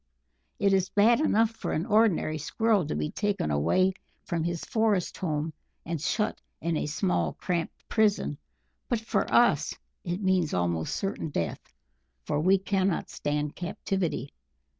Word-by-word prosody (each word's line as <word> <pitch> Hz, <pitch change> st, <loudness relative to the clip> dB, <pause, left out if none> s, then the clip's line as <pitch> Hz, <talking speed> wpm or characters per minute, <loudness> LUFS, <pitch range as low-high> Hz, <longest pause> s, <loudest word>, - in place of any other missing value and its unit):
"It 200 Hz, -1 st, +3 dB
is 190 Hz, -1 st, +2 dB
bad 225 Hz, +4 st, +4 dB
enough 225 Hz, -7 st, +3 dB
for 225 Hz, -, -4 dB
an 160 Hz, -, -1 dB
ordinary 210 Hz, -8 st, +2 dB
Squirrel 210 Hz, +2 st, +1 dB
to -, -, -2 dB
be 75 Hz, 0 st, -2 dB
taken 205 Hz, -, -1 dB
away 185 Hz, -, +3 dB, 0.3 s
from 170 Hz, -3 st, -2 dB
his 170 Hz, 0 st, -2 dB
forest 220 Hz, -5 st, +1 dB
home 155 Hz, -2 st, -2 dB, 0.3 s
and 165 Hz, -3 st, -3 dB
shut 210 Hz, +7 st, -1 dB, 0.2 s
in 170 Hz, 0 st, -1 dB
a 150 Hz, -, -1 dB
small 90 Hz, -, 0 dB
cramped 170 Hz, -2 st, -3 dB
prison, 205 Hz, -9 st, +1 dB, 0.5 s
but 240 Hz, -, +1 dB
for 225 Hz, -, -1 dB
us -, -, +4 dB, 0.3 s
it 175 Hz, +1 st, -2 dB
means 185 Hz, -5 st, +1 dB
almost 85 Hz, -2 st, 0 dB
certain 195 Hz, -5 st, -3 dB
death, 85 Hz, -, -3 dB, 0.5 s
for 145 Hz, -, -1 dB
we 185 Hz, +5 st, +4 dB
cannot 195 Hz, -1 st, 0 dB
stand 150 Hz, 0 st, -2 dB
captivity.... 180 Hz, -, -2 dB
180 Hz, 145 wpm, -28 LUFS, 150-205 Hz, 0.5 s, bad